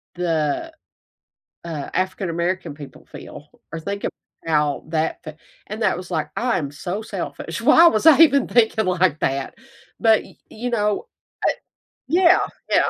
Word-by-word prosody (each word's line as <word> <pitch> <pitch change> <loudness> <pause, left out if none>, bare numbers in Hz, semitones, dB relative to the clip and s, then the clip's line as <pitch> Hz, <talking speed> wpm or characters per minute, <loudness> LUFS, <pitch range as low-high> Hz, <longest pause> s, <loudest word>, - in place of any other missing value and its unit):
the, 165 - -1 0.9
uh, 155 -4 -5
African 185 0 -1
American 170 -1 -2
people 145 -2 -12
feel - - -11 0.2
or 165 - -5
think 200 +4 -5 0.4
about 150 -2 0
that 160 0 -1
fee" 155 - -7 0.4
And 215 +2 -6
that - - +2
was 180 0 -9
like, 160 -3 -2
I 245 0 +1
am 140 -3 -4
so 175 +7 -5
selfish. - - -6
Why 335 - +7
was 215 -7 0
I 315 - +8
even 280 -5 +6
thinking 220 -2 +2
like 180 -4 +1
that? 135 0 -2 0.5
But 220 -1 +4
y - - -17
you 240 +3 -5
know, 210 - 0 1.0
I - - -7
yeah, 365 +1 +6 0.3
yeah. - - +3
185 Hz, 155 wpm, -21 LUFS, 155-220 Hz, 1.0 s, I